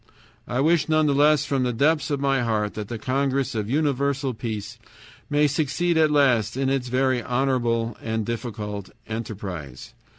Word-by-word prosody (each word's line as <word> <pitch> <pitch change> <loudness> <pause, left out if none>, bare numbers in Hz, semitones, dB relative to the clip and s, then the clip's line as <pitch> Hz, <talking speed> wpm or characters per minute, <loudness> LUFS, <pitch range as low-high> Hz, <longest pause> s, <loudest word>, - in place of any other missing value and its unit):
"I 125 +2 0
wish 160 0 +2
none 155 0 +3
the 145 - +2
less 145 0 +4
from 140 -2 0
the 125 -1 +1
depths 150 +7 +2
of 145 -2 -1
my 135 -1 +1
heart 110 -3 0
that 105 -2 -5
the 120 - -5
Congress 135 +2 0
of 105 -2 -3
Universal 140 -1 0
Peace 110 -3 -5 0.5
may 145 +1 +3
succeed 150 +4 0
at 160 -1 +4
last 130 -6 +2
in 135 0 +1
its 135 -2 -1
very 130 0 +1
honorable 120 -2 0
and 110 -1 -2
difficult 105 -4 -5 0.2
enterprise. 95 - -6
130 Hz, 165 wpm, -24 LUFS, 115-140 Hz, 0.5 s, less